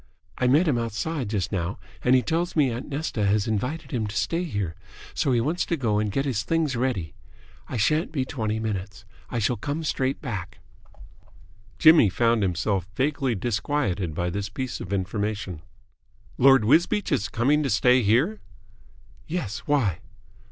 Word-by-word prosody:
I 125 Hz, -, +2 dB
met 150 Hz, +8 st, +4 dB
him 130 Hz, -6 st, +2 dB
outside 115 Hz, +3 st, -3 dB
just 100 Hz, -4 st, -2 dB
now 90 Hz, -2 st, -2 dB, 0.3 s
and 125 Hz, +1 st, +5 dB
he 125 Hz, -, +3 dB
tells 170 Hz, +2 st, -1 dB
me 145 Hz, -5 st, +3 dB
aunt 120 Hz, +5 st, -5 dB
Nesta 140 Hz, -6 st, -2 dB
has 100 Hz, +1 st, +2 dB
invited 130 Hz, +8 st, -2 dB
him 110 Hz, -4 st, -1 dB
to 105 Hz, -, -7 dB
stay 170 Hz, -, 0 dB
here, 100 Hz, -, -3 dB, 0.4 s
so 140 Hz, -, 0 dB
he 120 Hz, -, +3 dB
wants 155 Hz, +9 st, 0 dB
to 170 Hz, -, 0 dB
go 110 Hz, -6 st, +1 dB
and 105 Hz, -1 st, -1 dB
get 135 Hz, +6 st, -1 dB
his 125 Hz, -6 st, 0 dB
things 160 Hz, 0 st, 0 dB
ready. 120 Hz, -, -1 dB, 0.5 s
I 125 Hz, -, -4 dB
shan't 155 Hz, +10 st, +1 dB
be 135 Hz, -5 st, -1 dB
twenty 110 Hz, -5 st, -2 dB
minutes. 105 Hz, -1 st, -4 dB, 0.2 s
I 120 Hz, -, -3 dB
shall 115 Hz, +2 st, +1 dB
come 145 Hz, +8 st, -3 dB
straight 135 Hz, -3 st, -1 dB
back." 105 Hz, -, -5 dB, 1.2 s
Jimmy 155 Hz, -9 st, +7 dB
found 115 Hz, +3 st, +2 dB
himself 95 Hz, 0 st, -1 dB
vaguely 135 Hz, -2 st, 0 dB
disquieted 100 Hz, -, -1 dB
by 90 Hz, +1 st, -1 dB
this 100 Hz, +2 st, -3 dB
piece 130 Hz, +4 st, -4 dB
of -, -, -7 dB
information. 100 Hz, -2 st, -2 dB, 0.8 s
"Lord 135 Hz, -3 st, +6 dB
Wisbeach 175 Hz, -, +3 dB
is 100 Hz, -, 0 dB
coming 135 Hz, +6 st, +2 dB
to 140 Hz, -, -1 dB
stay 125 Hz, +5 st, +4 dB
here?" 125 Hz, -, +2 dB, 0.9 s
"Yes. 150 Hz, -, -3 dB
Why?" 120 Hz, -, +1 dB
120 Hz, 165 wpm, -25 LUFS, 100-145 Hz, 1.2 s, Jimmy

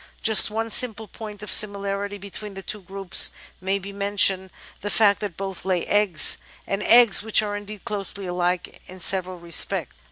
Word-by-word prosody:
Just 220 Hz, -2 st, +5 dB
one 225 Hz, +1 st, -4 dB
simple 225 Hz, -3 st, +2 dB
point 210 Hz, -1 st, -10 dB
of 210 Hz, -, -5 dB
similarity 200 Hz, 0 st, +2 dB
between 200 Hz, +1 st, -9 dB
the 195 Hz, -, -9 dB
two 210 Hz, +3 st, -7 dB
groups 195 Hz, 0 st, +3 dB, 0.3 s
may 190 Hz, +1 st, -1 dB
be 200 Hz, +1 st, -10 dB
mentioned, 200 Hz, -1 st, +1 dB, 0.3 s
the 205 Hz, -, -5 dB
fact 205 Hz, -1 st, +2 dB
that 200 Hz, -5 st, -7 dB
both 195 Hz, -2 st, -7 dB
lay 185 Hz, -2 st, -2 dB
^ggs, 205 Hz, -6 st, +2 dB, 0.3 s
and 195 Hz, +1 st, -4 dB
eggs 235 Hz, -3 st, +5 dB
which 220 Hz, 0 st, +2 dB
are 205 Hz, -1 st, -4 dB
indeed 205 Hz, 0 st, -10 dB
closely 200 Hz, -1 st, -3 dB
alike 180 Hz, 0 st, -3 dB
in 185 Hz, +1 st, -13 dB
several 185 Hz, 0 st, 0 dB
respects. 170 Hz, -1 st, +1 dB
200 Hz, 170 wpm, -22 LUFS, 190-210 Hz, 0.3 s, Just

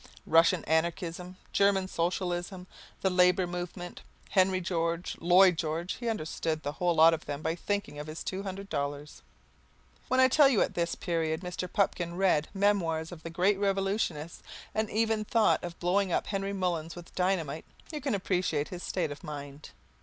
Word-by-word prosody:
Russian 165 Hz, +1 st, +4 dB
Anarchism, 170 Hz, +2 st, -1 dB, 0.2 s
German 200 Hz, -1 st, +3 dB
Socialism, 180 Hz, +1 st, -2 dB, 0.4 s
the 190 Hz, -, +2 dB
Labour 180 Hz, 0 st, +4 dB
Movement, 175 Hz, 0 st, -6 dB, 0.3 s
Henry 185 Hz, -1 st, +3 dB
George, 170 Hz, -1 st, -2 dB
Lloyd 180 Hz, 0 st, +5 dB
George, 165 Hz, +2 st, -2 dB
he 240 Hz, -2 st, -2 dB
understood 160 Hz, -5 st, -2 dB
the 145 Hz, -, -2 dB
whole 175 Hz, +2 st, 0 dB
lot 160 Hz, +1 st, +7 dB
of 160 Hz, -, -4 dB
them 145 Hz, +1 st, -4 dB
by 160 Hz, -, 0 dB
thinking 200 Hz, -3 st, -3 dB
of 150 Hz, -, -6 dB
his 155 Hz, +1 st, -6 dB
two 190 Hz, +1 st, -3 dB
hundred 195 Hz, 0 st, -6 dB
dollars. 145 Hz, -4 st, -4 dB, 0.9 s
When 255 Hz, -, +2 dB
I 260 Hz, -, +7 dB
tell 280 Hz, +1 st, +6 dB
you 255 Hz, -, +2 dB
that -, -, +3 dB
at -, -, -16 dB
this 170 Hz, -1 st, -1 dB
period 165 Hz, -2 st, -1 dB
Mr. 180 Hz, 0 st, -5 dB
Pupkin 175 Hz, -4 st, 0 dB
read 180 Hz, -6 st, +2 dB
Memoirs 185 Hz, -5 st, +1 dB
of 170 Hz, -3 st, -9 dB
the 165 Hz, -, -6 dB
Great 190 Hz, +4 st, +2 dB
Revolutionists 195 Hz, -5 st, -1 dB, 0.3 s
and 220 Hz, 0 st, 0 dB
even 220 Hz, 0 st, +1 dB
thought 220 Hz, +1 st, +2 dB
of 175 Hz, -1 st, -7 dB
blowing 185 Hz, +2 st, +1 dB
up -, -, +1 dB
Henry 195 Hz, -1 st, -2 dB
Mullins 175 Hz, -4 st, -2 dB
with 175 Hz, -1 st, -11 dB
dynamite, 170 Hz, -5 st, -1 dB, 0.3 s
you 300 Hz, -2 st, -5 dB
can 270 Hz, -5 st, 0 dB
appreciate 180 Hz, -6 st, -1 dB
his 180 Hz, -1 st, -7 dB
state 170 Hz, -5 st, -2 dB
of 145 Hz, 0 st, -9 dB
mind. 145 Hz, -1 st, -8 dB
180 Hz, 175 wpm, -29 LUFS, 165-195 Hz, 0.9 s, lot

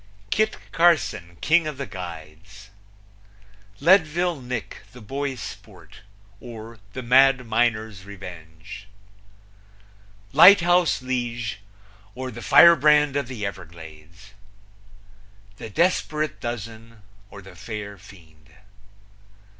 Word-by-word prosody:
Kit 215 Hz, +1 st, 0 dB
Carson, 155 Hz, -, +1 dB
King 160 Hz, 0 st, +2 dB
of 150 Hz, -3 st, -6 dB
the 140 Hz, -, -5 dB
Guides. 90 Hz, +1 st, -11 dB, 1.1 s
Leadville 170 Hz, -1 st, +2 dB
Nick, 125 Hz, -2 st, -6 dB
the 125 Hz, -, -12 dB
Boy 135 Hz, +5 st, -4 dB
Sport; 100 Hz, -4 st, -11 dB, 0.4 s
or, 115 Hz, -2 st, -11 dB
The 130 Hz, -, -6 dB
Mad 130 Hz, +1 st, +4 dB
Miner's 110 Hz, -3 st, -1 dB
Revenge. 90 Hz, -2 st, -11 dB, 1.5 s
Lighthouse 175 Hz, -2 st, +5 dB
Lige; 120 Hz, -4 st, -4 dB, 0.6 s
or, 130 Hz, 0 st, -6 dB
The 120 Hz, 0 st, -10 dB
Firebrand 150 Hz, -3 st, +5 dB
of 140 Hz, -3 st, -2 dB
the 115 Hz, -5 st, -6 dB
Everglades. 85 Hz, +1 st, -11 dB, 1.2 s
The 110 Hz, -, -9 dB
Desperate 155 Hz, -, -1 dB
Dozen; 115 Hz, -1 st, -8 dB, 0.3 s
or, 100 Hz, -, -12 dB
The 95 Hz, -1 st, -14 dB
Fair 100 Hz, +1 st, -8 dB
Fiend. 80 Hz, -5 st, -18 dB
115 Hz, 95 wpm, -23 LUFS, 95-140 Hz, 1.5 s, Lighthouse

